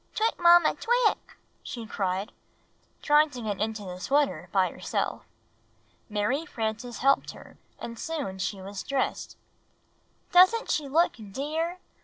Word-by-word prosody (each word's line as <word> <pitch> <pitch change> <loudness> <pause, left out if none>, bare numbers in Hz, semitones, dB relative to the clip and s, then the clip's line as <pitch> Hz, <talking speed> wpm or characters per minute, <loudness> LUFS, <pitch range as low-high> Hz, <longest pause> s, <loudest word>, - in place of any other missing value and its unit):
"Twick, 445 +1 0
Mamma! 345 -1 +6
Twick!" 480 -1 0 0.2
she 235 -2 -7
cried, 195 -1 -2 0.7
trying 300 +1 +5
to 250 -3 -8
get 205 -2 -3
into 220 -1 -2
the 180 -1 -7
sweater 225 - 0
by 185 -3 +2
herself. - - -3 0.8
Mary 215 +8 0
Frances 230 -5 -4
helped 275 +2 +2
her - - -14 0.2
and 230 -1 -8
soon 285 -13 -4
she 190 +2 -2
was 195 0 -6
dressed. 275 -1 -2 0.9
"Doesn't 375 +6 +5
she 300 -2 0
look 330 +2 +2
dear!" 315 - -3
255 Hz, 130 wpm, -27 LUFS, 205-325 Hz, 0.9 s, Mamma